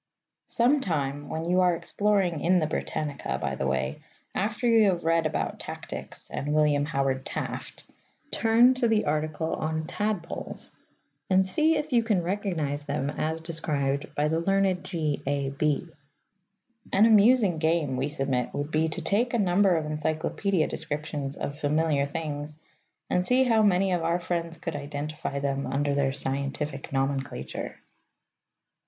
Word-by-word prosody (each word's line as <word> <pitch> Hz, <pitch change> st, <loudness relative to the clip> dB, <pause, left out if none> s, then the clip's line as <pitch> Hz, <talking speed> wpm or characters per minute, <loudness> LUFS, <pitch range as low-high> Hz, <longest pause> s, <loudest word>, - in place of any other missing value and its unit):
Some 260 Hz, +5 st, +3 dB
time 145 Hz, -, -2 dB
when 160 Hz, +1 st, -3 dB
you 180 Hz, +1 st, +3 dB
are 180 Hz, -1 st, +4 dB
exploring 185 Hz, 0 st, 0 dB
in 180 Hz, +2 st, +4 dB
the 160 Hz, -, +2 dB
Britannica, 155 Hz, -1 st, -3 dB
by 65 Hz, -, -2 dB
the 65 Hz, 0 st, -2 dB
way, 65 Hz, +1 st, -1 dB, 0.3 s
after 210 Hz, +4 st, -1 dB
you 225 Hz, -3 st, +6 dB
have 175 Hz, -2 st, -1 dB
read 165 Hz, 0 st, +3 dB
about -, -, -3 dB
Tactics -, -, -8 dB
and 150 Hz, +2 st, -2 dB
William 150 Hz, -2 st, +3 dB
Howard 135 Hz, -3 st, 0 dB
Taft, -, -, -5 dB, 0.5 s
turn 235 Hz, +3 st, +5 dB
to 255 Hz, -2 st, +1 dB
the 220 Hz, -2 st, +2 dB
article 155 Hz, +2 st, -1 dB
on 160 Hz, 0 st, -2 dB
Tadpoles 205 Hz, -1 st, -3 dB, 0.6 s
and 190 Hz, 0 st, +4 dB
see 310 Hz, +11 st, +3 dB
if 300 Hz, -2 st, -3 dB
you 235 Hz, -, +5 dB
can 210 Hz, -6 st, +1 dB
recognize 170 Hz, -7 st, -2 dB
them 145 Hz, 0 st, -1 dB
as 160 Hz, +2 st, -2 dB
described 150 Hz, -4 st, -2 dB
by 150 Hz, +1 st, +2 dB
the 160 Hz, +2 st, +1 dB
learned 195 Hz, 0 st, +1 dB
G.A.B. 145 Hz, -2 st, -1 dB, 1.0 s
An 205 Hz, +3 st, +5 dB
amusing 215 Hz, -4 st, +5 dB
game, 160 Hz, -4 st, +1 dB
we 135 Hz, +3 st, -1 dB
submit, 135 Hz, -4 st, -1 dB
would 145 Hz, +2 st, -3 dB
be 160 Hz, +1 st, +2 dB
to 155 Hz, -, -4 dB
take 235 Hz, +4 st, +1 dB
a -, -, +3 dB
number 190 Hz, -2 st, +3 dB
of 155 Hz, -, -2 dB
encyclopædia 155 Hz, +4 st, 0 dB
descriptions 150 Hz, -3 st, -4 dB
of 140 Hz, +1 st, -5 dB
familiar 150 Hz, -1 st, +1 dB
things, 150 Hz, -1 st, -5 dB, 0.5 s
and 180 Hz, -, +1 dB
see 250 Hz, +6 st, +4 dB
how 230 Hz, -3 st, +3 dB
many 195 Hz, -2 st, +3 dB
of 175 Hz, -2 st, +1 dB
our 170 Hz, +2 st, +1 dB
friends 170 Hz, -1 st, -3 dB
could 165 Hz, -1 st, -5 dB
identify 145 Hz, 0 st, -4 dB
them 140 Hz, 0 st, -1 dB
under 145 Hz, +1 st, 0 dB
their 140 Hz, -1 st, +1 dB
scientific 140 Hz, +1 st, -3 dB
nomenclature. 135 Hz, -, -3 dB
160 Hz, 150 wpm, -27 LUFS, 145-190 Hz, 1.0 s, you